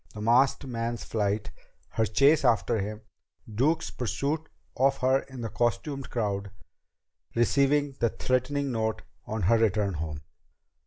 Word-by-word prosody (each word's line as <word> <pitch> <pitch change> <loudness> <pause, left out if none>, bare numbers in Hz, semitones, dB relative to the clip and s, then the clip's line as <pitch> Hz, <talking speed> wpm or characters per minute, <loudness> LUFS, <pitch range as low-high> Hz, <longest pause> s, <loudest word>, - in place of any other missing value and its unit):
_"; - - -22
the 105 - -8
masked 125 +6 +3
man's 120 -2 -3
flight; 105 -1 -1 0.4
her 110 - 0
chase 140 +9 +4
after 120 -2 +2
him; 105 +2 -4 0.5
Duke's 140 +10 0
pursuit 140 - -2 0.3
of 135 +1 +3
her 130 +1 +3
in 130 -3 -10
the 115 - -3
costumed 135 +5 -1
crowd; 100 -4 -2 0.9
receiving 140 +4 +3
the 115 - +3
threatening 130 +4 -1
note 110 -2 -1 0.2
on 110 -2 -3
her 110 +6 +4
return 105 -3 +1
home. 75 -2 -4
120 Hz, 140 wpm, -28 LUFS, 105-135 Hz, 0.9 s, chase